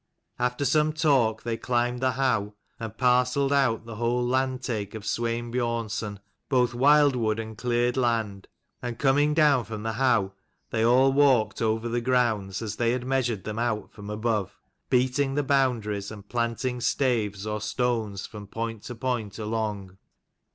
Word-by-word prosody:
After 125 Hz, +3 st, 0 dB
some 155 Hz, +1 st, +2 dB
talk, 135 Hz, -8 st, +2 dB
they 115 Hz, -1 st, -2 dB
climbed 120 Hz, +1 st, 0 dB
the 130 Hz, 0 st, +1 dB
howe 120 Hz, -6 st, 0 dB, 0.2 s
and 110 Hz, -1 st, -6 dB
parcelled 125 Hz, +2 st, +2 dB
out 125 Hz, -5 st, +2 dB
the 115 Hz, -2 st, -8 dB
whole 120 Hz, +2 st, 0 dB
landtake 125 Hz, -5 st, -1 dB
of 110 Hz, -, -7 dB
Swein 120 Hz, +1 st, -2 dB
Biornson, 115 Hz, -4 st, -2 dB, 0.3 s
both 125 Hz, -3 st, +2 dB
wild 145 Hz, +2 st, +5 dB
wood 110 Hz, -2 st, 0 dB
and 110 Hz, 0 st, -6 dB
cleared 120 Hz, +2 st, 0 dB
land: 110 Hz, -6 st, -1 dB, 0.3 s
and 120 Hz, -1 st, -4 dB
coming 145 Hz, +2 st, +3 dB
down 150 Hz, -5 st, +4 dB
from 110 Hz, -1 st, -6 dB
the 110 Hz, -, -1 dB
howe 115 Hz, -6 st, +2 dB, 0.4 s
they 110 Hz, -1 st, +1 dB
all 130 Hz, +3 st, +5 dB
walked 130 Hz, -7 st, +3 dB
over 110 Hz, +1 st, 0 dB
the 120 Hz, +1 st, -1 dB
grounds 115 Hz, -6 st, 0 dB
as 110 Hz, -, -5 dB
they 120 Hz, 0 st, +2 dB
had 125 Hz, 0 st, -3 dB
measured 125 Hz, -6 st, 0 dB
them 110 Hz, +2 st, -4 dB
out 115 Hz, -3 st, -2 dB
from 105 Hz, -1 st, -9 dB
above, 105 Hz, -2 st, -2 dB, 0.3 s
beating 130 Hz, +2 st, +1 dB
the 145 Hz, -, +1 dB
boundaries, 120 Hz, -7 st, 0 dB
and 105 Hz, -2 st, -10 dB
planting 120 Hz, +2 st, -2 dB
staves 110 Hz, -7 st, 0 dB
or 105 Hz, 0 st, -3 dB
stones 110 Hz, -3 st, -1 dB
from 105 Hz, -2 st, -10 dB
point 115 Hz, 0 st, -4 dB
to 120 Hz, -, -6 dB
point 115 Hz, -4 st, -3 dB
along. 105 Hz, -4 st, -3 dB
120 Hz, 160 wpm, -26 LUFS, 110-130 Hz, 0.4 s, wild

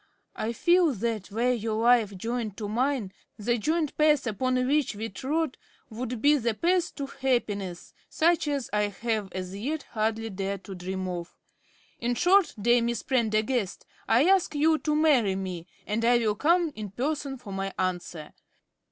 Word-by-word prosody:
I 220 Hz, -, -2 dB
feel 345 Hz, +5 st, +3 dB
that, 220 Hz, -2 st, -3 dB
were 235 Hz, +4 st, +1 dB
your 220 Hz, -2 st, -1 dB
life 230 Hz, -5 st, +4 dB
joined 225 Hz, 0 st, -3 dB
to 210 Hz, -, -4 dB
mine, 240 Hz, -2 st, -1 dB, 0.2 s
the 235 Hz, +3 st, 0 dB
joint 310 Hz, +5 st, 0 dB
path 300 Hz, -3 st, +4 dB
upon 255 Hz, +3 st, 0 dB
which 285 Hz, -3 st, +1 dB
we 220 Hz, +2 st, -4 dB
trod 285 Hz, +8 st, -2 dB, 0.3 s
would 240 Hz, +1 st, -5 dB
be 295 Hz, +1 st, +6 dB
the 235 Hz, -4 st, -1 dB
path 350 Hz, +5 st, +1 dB
to 280 Hz, -, -3 dB
happiness, 210 Hz, -10 st, -2 dB, 0.2 s
such 330 Hz, -1 st, +2 dB
as 280 Hz, -4 st, -1 dB
I 210 Hz, 0 st, +2 dB
have 210 Hz, -1 st, -3 dB
as 185 Hz, 0 st, -5 dB
yet 285 Hz, +9 st, -3 dB
hardly 225 Hz, 0 st, -1 dB
dared 195 Hz, 0 st, -4 dB
to 195 Hz, -, -8 dB
dream 185 Hz, +1 st, -4 dB
of. 175 Hz, -1 st, -5 dB, 0.6 s
In 240 Hz, +1 st, -1 dB
short, 360 Hz, +3 st, +4 dB
dear 240 Hz, +3 st, +4 dB
Miss 235 Hz, -1 st, -1 dB
Prendergast, 220 Hz, -3 st, 0 dB, 0.2 s
I 235 Hz, +6 st, +4 dB
ask 380 Hz, -5 st, +3 dB
you 310 Hz, +2 st, +3 dB
to 300 Hz, -1 st, 0 dB
marry 270 Hz, -11 st, +3 dB
me, 185 Hz, -3 st, -5 dB, 0.2 s
and 220 Hz, +2 st, -1 dB
I 240 Hz, +1 st, +5 dB
will 220 Hz, -3 st, +1 dB
come 330 Hz, -, +2 dB
in 215 Hz, -2 st, -6 dB
person 275 Hz, +5 st, -3 dB
for 210 Hz, -5 st, -9 dB
my 195 Hz, 0 st, -3 dB
answer. 175 Hz, -3 st, -3 dB
235 Hz, 170 wpm, -27 LUFS, 205-285 Hz, 0.6 s, be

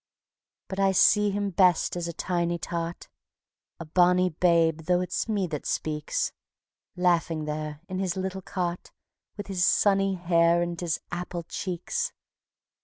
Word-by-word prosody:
But 190 Hz, -, -5 dB
I 195 Hz, -1 st, +3 dB
see 210 Hz, +2 st, +5 dB
him 200 Hz, 0 st, -2 dB
best 180 Hz, -2 st, +3 dB
as 175 Hz, -1 st, -3 dB
a -, -, -3 dB
tiny 175 Hz, 0 st, -1 dB
tot, 170 Hz, 0 st, -5 dB, 0.7 s
A 165 Hz, -, -6 dB
bonny 180 Hz, +3 st, +3 dB
babe, 165 Hz, -1 st, +2 dB
though 180 Hz, -1 st, +3 dB
it's 180 Hz, +5 st, -2 dB
me 205 Hz, -3 st, +1 dB
that 155 Hz, -4 st, -5 dB
speaks; 150 Hz, -1 st, -1 dB, 0.6 s
Laughing 170 Hz, -3 st, +1 dB
there 150 Hz, 0 st, -4 dB
in 185 Hz, -1 st, -4 dB
his 190 Hz, -2 st, -1 dB
little 190 Hz, 0 st, -3 dB
cot, 180 Hz, -2 st, -4 dB, 0.5 s
With 205 Hz, -, -5 dB
his 190 Hz, -2 st, -1 dB
sunny 195 Hz, 0 st, +3 dB
hair 170 Hz, -1 st, +3 dB
and 175 Hz, 0 st, -4 dB
his 170 Hz, -3 st, -1 dB
apple 175 Hz, 0 st, -4 dB
cheeks. 195 Hz, -, -3 dB
175 Hz, 145 wpm, -27 LUFS, 170-190 Hz, 0.7 s, see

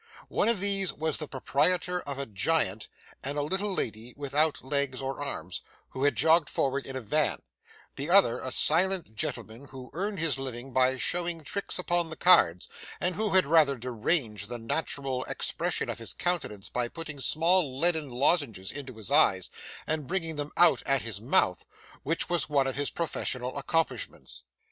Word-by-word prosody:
One -, -, +1 dB
of 230 Hz, -4 st, +1 dB
these 195 Hz, -1 st, +3 dB
was 160 Hz, 0 st, -2 dB
the 155 Hz, -, -5 dB
proprietor 180 Hz, +7 st, 0 dB
of 140 Hz, -1 st, -6 dB
a 140 Hz, -, -3 dB
giant, 110 Hz, -1 st, -1 dB, 0.4 s
and 140 Hz, +2 st, -4 dB
a 145 Hz, -, 0 dB
little 190 Hz, +7 st, -1 dB
lady 115 Hz, -, -3 dB
without 145 Hz, +2 st, 0 dB
legs 140 Hz, -2 st, -1 dB
or 135 Hz, +1 st, -4 dB
arms, 90 Hz, -, -6 dB, 0.3 s
who 130 Hz, +2 st, -2 dB
had 145 Hz, -3 st, +2 dB
jogged 160 Hz, +4 st, +4 dB
forward 135 Hz, 0 st, -1 dB
in 135 Hz, -, -7 dB
a 130 Hz, -, -3 dB
van; 150 Hz, +7 st, 0 dB, 0.5 s
the 140 Hz, +4 st, -4 dB
other, 185 Hz, -10 st, +5 dB
a 130 Hz, -, -5 dB
silent 175 Hz, -, +5 dB
gentleman 120 Hz, -2 st, -4 dB
who 130 Hz, -2 st, -11 dB
earned 200 Hz, +5 st, -3 dB
his 160 Hz, -5 st, 0 dB
living 130 Hz, -1 st, -7 dB
by 130 Hz, +1 st, +3 dB
showing 170 Hz, +4 st, -1 dB
tricks 200 Hz, +7 st, -4 dB
upon 175 Hz, -2 st, +1 dB
the 160 Hz, -, -7 dB
cards, 90 Hz, -, +4 dB, 0.3 s
and 180 Hz, -, 0 dB
who 210 Hz, -1 st, -1 dB
had 185 Hz, -, +6 dB
rather 145 Hz, -3 st, +4 dB
deranged 115 Hz, -, -1 dB
the 120 Hz, -, -4 dB
natural 130 Hz, +2 st, -3 dB
expression -, -, -2 dB
of -, -, -4 dB
his -, -, -9 dB
countenance 165 Hz, -, -2 dB
by 125 Hz, -1 st, -2 dB
putting 150 Hz, +1 st, -7 dB
small 160 Hz, 0 st, +3 dB
leaden 160 Hz, -3 st, 0 dB
lozenges 125 Hz, -, +1 dB
into 135 Hz, -3 st, -8 dB
his 110 Hz, +4 st, -6 dB
eyes 100 Hz, -, +3 dB, 0.3 s
and 155 Hz, -3 st, -3 dB
bringing 165 Hz, -4 st, -3 dB
them 145 Hz, 0 st, -5 dB
out 175 Hz, -1 st, +5 dB
at 135 Hz, -1 st, +1 dB
his 110 Hz, -3 st, -5 dB
mouth, 110 Hz, -7 st, +2 dB, 0.4 s
which 165 Hz, +3 st, 0 dB
was 170 Hz, -4 st, -1 dB
one 140 Hz, -2 st, +2 dB
of 135 Hz, -, -2 dB
his 145 Hz, +1 st, -1 dB
professional 130 Hz, -6 st, -3 dB
accomplishments. 160 Hz, +3 st, -2 dB
145 Hz, 175 wpm, -28 LUFS, 130-165 Hz, 0.5 s, had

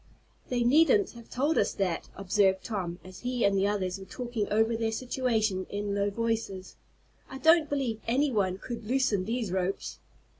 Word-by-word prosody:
"They 245 Hz, -1 st, +1 dB
needn't 325 Hz, -, +4 dB
have 235 Hz, -1 st, -13 dB
told 290 Hz, +6 st, +1 dB
us -, -, +1 dB
that," 185 Hz, -4 st, -2 dB
observed 195 Hz, 0 st, +2 dB
Tom, 185 Hz, -6 st, -3 dB
as 185 Hz, 0 st, -11 dB
he 245 Hz, -2 st, 0 dB
and 200 Hz, 0 st, +3 dB
the 195 Hz, +1 st, +2 dB
others 195 Hz, -2 st, -1 dB
were 190 Hz, -, -9 dB
talking 235 Hz, 0 st, -3 dB
over 220 Hz, +2 st, +3 dB
their 225 Hz, 0 st, -1 dB
situation 220 Hz, -6 st, 0 dB
in 205 Hz, 0 st, -3 dB
low 200 Hz, 0 st, +1 dB
voices. 220 Hz, -3 st, -3 dB, 0.5 s
"I 265 Hz, -, -7 dB
don't 320 Hz, +1 st, +5 dB
believe 255 Hz, -6 st, -1 dB
any 270 Hz, +5 st, +2 dB
one 190 Hz, -5 st, +1 dB
could 235 Hz, +1 st, -7 dB
loosen 235 Hz, -7 st, +1 dB
these 225 Hz, -2 st, -2 dB
ropes." 190 Hz, +1 st, -2 dB
220 Hz, 175 wpm, -29 LUFS, 195-250 Hz, 0.5 s, don't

